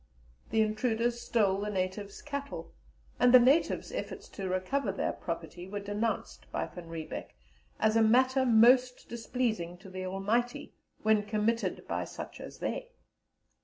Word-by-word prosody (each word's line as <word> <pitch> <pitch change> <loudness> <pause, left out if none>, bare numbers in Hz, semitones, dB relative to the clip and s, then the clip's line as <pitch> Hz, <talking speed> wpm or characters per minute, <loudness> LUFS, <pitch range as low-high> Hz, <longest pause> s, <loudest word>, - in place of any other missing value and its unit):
The 220 0 +3
intruders 230 +2 0
stole 200 -4 +2
the 210 - -2
natives' 195 +1 -3
cattle, 280 -1 -5 0.5
and 250 0 +6
the 255 - +10
natives' 270 +7 +3
efforts - - -5
to 190 -2 -5
recover 195 +6 0
their 195 - -1
property 170 +1 -6
were 205 +1 -4
denounced 205 +3 -3
by - - -1
Van 175 -2 -10
Riebeck 165 -1 -6 0.4
as 220 0 +3
"a 225 - +5
matter 260 +4 +4
most 250 +1 +5
displeasing 225 -7 -2
to 190 +1 -13
the 185 0 -4
Almighty, 215 +6 -1 0.3
when 215 -1 +4
committed 215 +2 -1
by - - -1
such - - -8
as - - -9
they." - - -3
220 Hz, 145 wpm, -31 LUFS, 195-245 Hz, 0.5 s, the